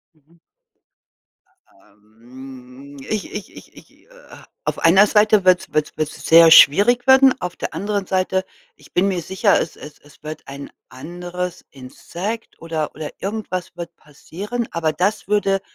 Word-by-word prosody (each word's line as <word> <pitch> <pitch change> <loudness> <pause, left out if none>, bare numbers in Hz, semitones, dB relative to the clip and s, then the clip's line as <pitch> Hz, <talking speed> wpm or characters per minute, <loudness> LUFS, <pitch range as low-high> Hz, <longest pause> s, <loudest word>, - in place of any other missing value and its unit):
Mhm. 160 +3 -30 1.3
Ähm, 125 +7 -15
ich 215 -2 -3
ich 205 - -8
ich - - -15
ich - - -17 0.2
äh, - - -31 0.6
auf - - -3
einer 190 +5 +5
Seite 210 -1 +3
wird's 185 -1 +2
wird's 155 -1 -1
wird's 155 -1 -5
sehr 165 0 +7
schwierig 205 - +6
werden, 265 0 +6
auf 180 -1 -5
der - - -6
anderen 200 +2 -3
Seite, 190 0 -1 0.3
ich - - -20
bin 185 +3 +1
mir 180 -3 -2
sicher, 190 +3 +1
es 160 - -5
es 150 0 -12
es 145 -1 -22
wird 155 +1 -8
ein 140 +1 -9 0.2
anderes 175 +6 -7
Insekt 175 - -8
oder 160 -2 -4
oder 150 0 -7
irgendwas 185 -4 -5
wird 170 -1 -8
passieren, 200 +11 -7
aber 160 -2 -1
das 200 +5 -2
würde 200 -2 +1
175 Hz, 150 wpm, -20 LUFS, 150-200 Hz, 1.3 s, sehr